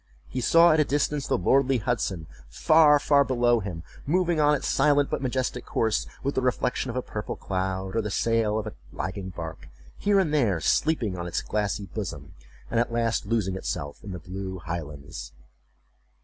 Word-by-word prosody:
He 130 Hz, -, -4 dB
saw 165 Hz, +7 st, +6 dB
at 155 Hz, -, +3 dB
a -, -, +6 dB
distance 145 Hz, 0 st, -1 dB
the -, -, +1 dB
lordly 135 Hz, +8 st, +3 dB
Hudson, 105 Hz, -8 st, -2 dB, 0.2 s
far, 150 Hz, -, +5 dB
far 145 Hz, 0 st, +4 dB
below 120 Hz, -3 st, +2 dB
him, 90 Hz, -5 st, -6 dB, 0.2 s
moving 175 Hz, +1 st, +1 dB
on 150 Hz, 0 st, +5 dB
its -, -, -3 dB
silent 145 Hz, -1 st, +3 dB
but -, -, -1 dB
majestic 130 Hz, -1 st, -2 dB
course, 110 Hz, -2 st, 0 dB, 0.2 s
with 140 Hz, +1 st, 0 dB
the -, -, 0 dB
reflection 125 Hz, 0 st, 0 dB
of 120 Hz, -, -4 dB
a 125 Hz, -, -1 dB
purple 105 Hz, -, -5 dB
cloud, 95 Hz, +1 st, -3 dB
or 115 Hz, -, +2 dB
the 105 Hz, -, -3 dB
sail 110 Hz, 0 st, +1 dB
of 110 Hz, -, -2 dB
a 110 Hz, -, -6 dB, 0.2 s
lagging 95 Hz, 0 st, -4 dB
bark, 80 Hz, -6 st, -8 dB, 0.3 s
here 200 Hz, -1 st, +3 dB
and 165 Hz, -6 st, +1 dB
there 115 Hz, -, +2 dB
sleeping 120 Hz, -, +1 dB
on 85 Hz, -, -4 dB
its 85 Hz, -, -2 dB
glassy 105 Hz, -1 st, -2 dB
bosom, 85 Hz, -9 st, -6 dB, 0.4 s
and 115 Hz, -, +2 dB
at 120 Hz, -, 0 dB
last 115 Hz, -3 st, 0 dB
losing 105 Hz, -4 st, 0 dB
itself 70 Hz, -6 st, -5 dB
in 100 Hz, -, -7 dB
the 90 Hz, -, -5 dB
blue 95 Hz, +2 st, -6 dB
highlands. 75 Hz, -7 st, -7 dB
115 Hz, 185 wpm, -26 LUFS, 95-140 Hz, 0.4 s, saw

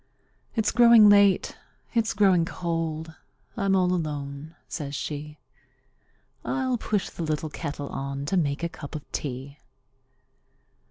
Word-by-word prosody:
"It's 220 Hz, -3 st, +1 dB
growing 235 Hz, -3 st, +7 dB
late; 200 Hz, -2 st, +4 dB, 0.4 s
it's 230 Hz, -3 st, +1 dB
growing 190 Hz, -4 st, +4 dB
cold; 165 Hz, -2 st, -3 dB, 0.4 s
I'm 195 Hz, -4 st, +1 dB
all 180 Hz, -1 st, +3 dB
alone," 150 Hz, -2 st, -4 dB
says 145 Hz, -3 st, -5 dB
she; 150 Hz, +2 st, -5 dB, 1.1 s
"I'll 260 Hz, -3 st, -1 dB
put 210 Hz, -3 st, 0 dB
the -, -, -8 dB
little 155 Hz, -1 st, -2 dB
kettle 145 Hz, -1 st, -5 dB
on, 140 Hz, +1 st, -4 dB
to 170 Hz, -, -1 dB
make 150 Hz, -3 st, 0 dB
a -, -, +2 dB
cup 150 Hz, -1 st, -9 dB
of 150 Hz, -, -5 dB
tea!" 140 Hz, +1 st, -5 dB
165 Hz, 125 wpm, -26 LUFS, 145-200 Hz, 1.1 s, growing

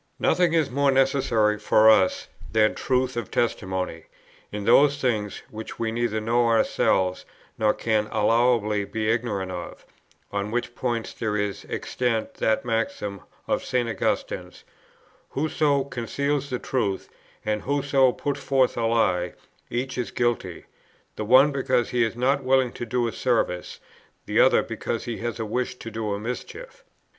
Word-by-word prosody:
"Nothing 175 Hz, -2 st, +2 dB
is 155 Hz, -5 st, +2 dB
more 140 Hz, +2 st, +2 dB
necessary 130 Hz, -6 st, +2 dB
[for 110 Hz, +1 st, +4 dB
us] 110 Hz, -4 st, +4 dB, 0.2 s
than 110 Hz, -1 st, +3 dB
truth 130 Hz, -1 st, 0 dB
of 120 Hz, -3 st, -4 dB
testimony, 95 Hz, -7 st, -2 dB, 0.5 s
in 105 Hz, 0 st, -4 dB
those 145 Hz, +3 st, +5 dB
things, 110 Hz, -7 st, -1 dB
which 110 Hz, +1 st, -8 dB
we 115 Hz, -1 st, -1 dB
neither 115 Hz, -1 st, -1 dB
know 115 Hz, +2 st, +2 dB
ourselves, 95 Hz, -4 st, +2 dB, 0.3 s
nor 110 Hz, -1 st, +3 dB
can 110 Hz, -2 st, 0 dB
allowably 110 Hz, -1 st, +2 dB
be 110 Hz, +2 st, -1 dB
ignorant 105 Hz, -5 st, -2 dB
of, 90 Hz, -1 st, -7 dB, 0.5 s
on 100 Hz, 0 st, -2 dB
which 120 Hz, +2 st, -2 dB
point 120 Hz, -2 st, -3 dB
there 105 Hz, -2 st, -1 dB
is 105 Hz, -1 st, -3 dB
extant 120 Hz, -3 st, -2 dB
that 110 Hz, +2 st, +1 dB
maxim 115 Hz, -, -2 dB, 0.3 s
of -, -, 0 dB
St. 125 Hz, -2 st, 0 dB
Augustine's: 110 Hz, -4 st, -3 dB, 0.7 s
Whoso 145 Hz, -1 st, +1 dB
conceals 140 Hz, +3 st, -2 dB
the 125 Hz, -, -1 dB
truth, 105 Hz, -7 st, -2 dB, 0.4 s
and 105 Hz, -1 st, 0 dB
whoso 140 Hz, -2 st, +2 dB
puts 140 Hz, +2 st, -3 dB
forth 135 Hz, -2 st, +2 dB
a 115 Hz, -1 st, +1 dB
lie, 90 Hz, -6 st, +1 dB, 0.4 s
each 130 Hz, +1 st, -3 dB
is 125 Hz, -, -2 dB
guilty; 120 Hz, -7 st, -2 dB, 0.5 s
the 105 Hz, -, -4 dB
one 130 Hz, +6 st, +6 dB
because 130 Hz, -3 st, 0 dB
he 120 Hz, -1 st, +2 dB
is 115 Hz, 0 st, -1 dB
not 135 Hz, +3 st, +1 dB
willing 130 Hz, -1 st, +3 dB
to 120 Hz, -, -6 dB
do 120 Hz, +1 st, 0 dB
a -, -, -2 dB
service, 115 Hz, -9 st, -1 dB, 0.5 s
the -, -, +1 dB
other -, -, +5 dB
because 115 Hz, -, -4 dB
he 120 Hz, -2 st, -4 dB
has 120 Hz, 0 st, -4 dB
a 110 Hz, -, -2 dB
wish 125 Hz, +4 st, -2 dB
to 115 Hz, -2 st, -9 dB
do 110 Hz, -1 st, -3 dB
a -, -, -5 dB
mischief. 125 Hz, -, -7 dB
115 Hz, 155 wpm, -25 LUFS, 110-130 Hz, 0.7 s, one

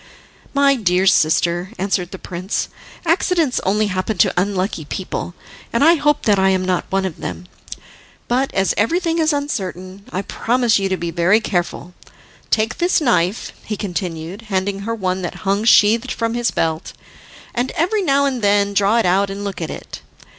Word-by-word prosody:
"My 280 Hz, 0 st, +4 dB
dear 190 Hz, -5 st, +1 dB
sister," 175 Hz, +1 st, +2 dB
answered 185 Hz, -2 st, -1 dB
the 190 Hz, -, -8 dB
prince, 185 Hz, +2 st, -4 dB, 0.4 s
"accidents 330 Hz, -4 st, +2 dB
only 210 Hz, +3 st, +2 dB
happen 190 Hz, +1 st, -2 dB
to -, -, +3 dB
unlucky 185 Hz, -2 st, -1 dB
people, 180 Hz, +2 st, -5 dB, 0.4 s
and 235 Hz, -, +2 dB
I 330 Hz, +3 st, +7 dB
hope 295 Hz, -2 st, +1 dB
that 205 Hz, -3 st, +3 dB
I 190 Hz, 0 st, +4 dB
am 185 Hz, -1 st, +1 dB
not 185 Hz, -1 st, -1 dB
one 195 Hz, 0 st, +1 dB
of 180 Hz, -4 st, -5 dB
them. 180 Hz, -, -6 dB, 0.8 s
But 260 Hz, +3 st, +1 dB
as 195 Hz, 0 st, +2 dB
everything 330 Hz, -, +1 dB
is 315 Hz, 0 st, +3 dB
uncertain, 195 Hz, -, -4 dB
I 190 Hz, -, -2 dB
promise 235 Hz, 0 st, +1 dB
you 195 Hz, 0 st, -1 dB
to 190 Hz, -, 0 dB
be 170 Hz, -1 st, -4 dB
very 175 Hz, +5 st, +3 dB
careful. 180 Hz, -3 st, -3 dB, 0.6 s
Take 220 Hz, 0 st, 0 dB
this 355 Hz, +2 st, +3 dB
knife," 220 Hz, -, 0 dB
he 210 Hz, -, -4 dB
continued, 180 Hz, -1 st, -4 dB
handing 195 Hz, 0 st, -1 dB
her 225 Hz, +3 st, -3 dB
one 185 Hz, -3 st, -2 dB
that 175 Hz, +3 st, -6 dB
hung 200 Hz, +3 st, +1 dB
sheathed 230 Hz, +3 st, +5 dB
from 230 Hz, -1 st, -1 dB
his 240 Hz, 0 st, 0 dB
belt, 160 Hz, -1 st, -2 dB, 0.6 s
"and 245 Hz, +2 st, -1 dB
every 380 Hz, +6 st, +1 dB
now 280 Hz, -5 st, +2 dB
and 260 Hz, -3 st, -1 dB
then 200 Hz, 0 st, +2 dB
draw 200 Hz, +3 st, +3 dB
it 230 Hz, -, +2 dB
out 195 Hz, +3 st, +2 dB
and 200 Hz, +1 st, -5 dB
look 200 Hz, -3 st, -5 dB
at 160 Hz, -, -3 dB
it. -, -, -8 dB
200 Hz, 175 wpm, -19 LUFS, 185-240 Hz, 0.8 s, I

